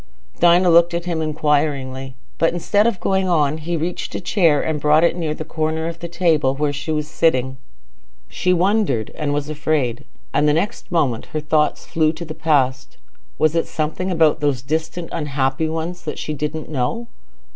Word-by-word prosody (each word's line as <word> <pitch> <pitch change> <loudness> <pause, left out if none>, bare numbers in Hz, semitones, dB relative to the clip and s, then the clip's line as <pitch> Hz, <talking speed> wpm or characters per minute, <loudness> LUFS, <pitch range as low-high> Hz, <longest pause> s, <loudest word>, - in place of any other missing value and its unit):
Dinah 175 +1 +5
looked 170 +1 +5
at 170 0 -3
him 170 -2 -2
inquiringly, 140 -4 -1 0.2
but 165 - +3
instead 205 +5 +2
of 205 -6 -1
going 190 -1 0
on, 155 -3 +2
he 170 +2 -2
reached 170 +3 -4
a - - -2
chair 170 -5 +2
and 150 -1 -2
brought 150 +2 +4
it 170 - +3
near 160 -3 -2
the 155 - -6
corner 160 0 -2
of 170 0 -6
the 170 - -5
table 165 -6 +1
where 145 0 0
she 145 +3 -4
was 150 -1 -1
sitting. 130 -5 +1 0.7
She 180 - -1
wondered, 180 - +1
and 150 -2 -2
was 145 0 -1
afraid—and 150 -1 -2
the 150 - +4
next 180 +4 -2
moment 140 -9 0
her 155 - 0
thoughts 150 0 0
flew 155 -1 +1
to 170 +1 -7
the 155 - -6
past: 140 -5 0 0.4
was 155 0 +2
it 165 - 0
something 160 +4 -2
about 160 -4 +3
those 140 -4 0
distant 160 +4 -3
unhappy 145 0 -1
ones 165 +2 -4
that 150 - -4
she 155 - -4
didn't 150 +1 -4
know? 150 - -2
155 Hz, 180 wpm, -20 LUFS, 145-170 Hz, 0.7 s, Dinah